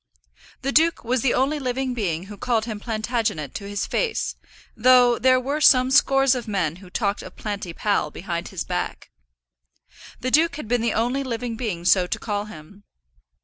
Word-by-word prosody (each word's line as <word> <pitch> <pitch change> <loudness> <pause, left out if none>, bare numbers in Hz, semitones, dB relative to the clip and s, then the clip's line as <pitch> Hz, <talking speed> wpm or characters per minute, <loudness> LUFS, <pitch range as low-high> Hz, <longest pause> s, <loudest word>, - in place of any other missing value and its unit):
The 275 - 0
duke 325 +3 +3
was 245 +1 0
the 260 - +2
only 280 +4 +1
living 260 -1 -2
being 180 -8 -2
who 205 +2 -10
called 225 +1 0
him 220 -3 -5
Plantagenet 220 - -2
to 200 -1 -6
his 205 0 -2
face, 465 -3 -1 0.4
though 245 0 +5
there 255 0 +4
were 280 +4 -2
some 255 -2 +5
scores 270 -1 +4
of 250 -3 -4
men 180 -6 -1
who 185 -1 -14
talked 200 +1 -1
of - - -11
Planty 200 -4 -5
Pal 200 -3 0
behind 170 +2 -5
his 185 -4 -5
back. - - -4 1.1
The 255 - -3
duke 320 +1 +3
had 295 -6 -7
been 245 +1 +1
the 230 -1 0
only 245 +5 0
living 240 -2 -4
being 210 -8 -4
so 180 +1 +4
to - - -2
call 205 -2 -3
him. 200 +1 -13
230 Hz, 185 wpm, -23 LUFS, 200-255 Hz, 1.1 s, though